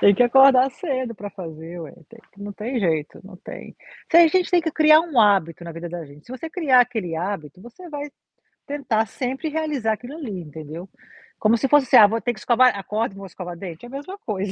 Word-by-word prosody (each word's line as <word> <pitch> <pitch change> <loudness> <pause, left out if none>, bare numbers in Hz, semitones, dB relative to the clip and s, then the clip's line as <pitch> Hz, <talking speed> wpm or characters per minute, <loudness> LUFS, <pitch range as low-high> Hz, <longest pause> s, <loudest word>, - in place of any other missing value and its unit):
Tem 200 -1 +6
que 245 - +3
acordar 265 +1 +6
cedo 260 -5 -4
pra 205 0 -8
fazer 165 -1 -9
ué, 155 -4 -9 0.2
tem 230 0 -16
que 200 - -19
não 205 0 -6
tem 230 +6 -4
jeito, 160 -7 -2
não 190 -1 -12
tem - - -11 0.3
tem 340 0 +7
a - - +5
gente 365 +3 +1
tem 355 - +4
que 320 -1 -2
criar 310 0 +6
um 325 -6 -3
hábito 185 -5 +2
na 170 - -7
vida 170 +1 -7
da 175 -1 -6
gente, 145 +1 -17
se 245 - -10
você 260 +5 -6
criar 285 -9 +3
aquele 220 -9 -1
hábito 170 -3 -5
você 255 - -13
vai, 290 -1 -6 0.6
tentar 260 -6 -1
sempre 265 +8 -4
realizar 295 -8 -1
aquilo 245 +6 -9
ali, 235 - -6
entendeu, 160 +2 -9 0.5
como 220 +2 +3
se 270 - 0
fosse: 270 -2 +4
"Ah 215 -3 +9
vou 225 +2 -2
ter 240 - -1
que 215 - -13
escovar 240 -1 +3
acordo 210 +2 -3
e - - -14
vou 195 - -9
escovar 175 -1 -8
dente.", 175 +2 -9
é - - -11
a - - -14
mesma 290 +9 -7
coisa. 200 - -4
225 Hz, 230 wpm, -22 LUFS, 185-270 Hz, 0.6 s, Ah